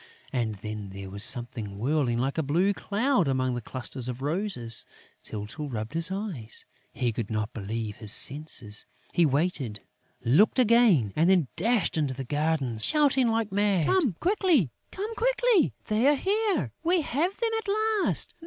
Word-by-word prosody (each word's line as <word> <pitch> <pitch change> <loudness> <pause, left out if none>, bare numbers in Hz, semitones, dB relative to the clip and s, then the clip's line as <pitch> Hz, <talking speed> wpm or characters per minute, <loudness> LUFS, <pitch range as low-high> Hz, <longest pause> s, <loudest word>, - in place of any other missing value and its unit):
And 115 -4 -1
then 105 0 -6
there 95 0 -8
was 100 +1 -3
something 115 -4 -3
whirling 130 0 0
like 135 +5 -1
a - - +3
blue 170 +8 +2
cloud 210 - +1
among 130 -1 0
the 120 - -3
clusters 130 +1 -4
of 125 +1 -5
roses. 150 - -1 0.4
Tyltyl 110 +8 -6
rubbed 110 0 -5
his 165 +2 +2
eyes; 190 - -4 0.3
he 120 -2 -1
could 110 -2 -4
not 110 0 -2
believe 110 0 -4
his 105 -2 0
senses. 125 -6 +1 0.3
He 170 -3 +4
waited, 140 - -1 0.4
looked 150 - +4
again 225 - +4
and 165 +3 +3
then 175 -9 +3
dashed 225 -7 +1
into 140 -4 -1
the 135 - -5
garden, 145 -4 -1
shouting 270 - +3
like 225 -1 0
mad: 200 -4 +2
"Come 305 - +2
quickly!... 350 - +2 0.2
Come 420 +4 -4
quickly!... - - +2
They 220 +5 +2
are 295 - +5
here!... 410 +5 0
We 345 +1 +2
have 325 +9 -1
them 460 -2 0
at 445 - -9 0.4
last!... - - -2
150 Hz, 165 wpm, -27 LUFS, -, 0.4 s, are